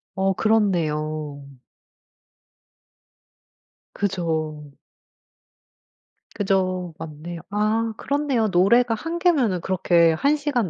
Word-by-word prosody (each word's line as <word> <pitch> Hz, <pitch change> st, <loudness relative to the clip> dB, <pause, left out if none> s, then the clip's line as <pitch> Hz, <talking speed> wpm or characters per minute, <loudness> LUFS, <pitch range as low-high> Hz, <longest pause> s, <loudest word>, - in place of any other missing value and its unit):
어 190 Hz, 0 st, +1 dB
그렇네요. 155 Hz, -9 st, 0 dB, 2.5 s
그죠. 160 Hz, -6 st, -3 dB, 1.6 s
그죠. 185 Hz, -3 st, -1 dB
맞네요. 160 Hz, +2 st, -8 dB
아 215 Hz, +2 st, 0 dB
그렇네요. 280 Hz, -6 st, 0 dB
노래가 225 Hz, +6 st, +3 dB
1 330 Hz, +8 st, -4 dB
개면은 265 Hz, -, +2 dB
그렇게 170 Hz, -3 st, +3 dB
1 285 Hz, -, +2 dB
시간 265 Hz, -, -1 dB
190 Hz, 155 characters per minute, -23 LUFS, 165-225 Hz, 2.5 s, 노래가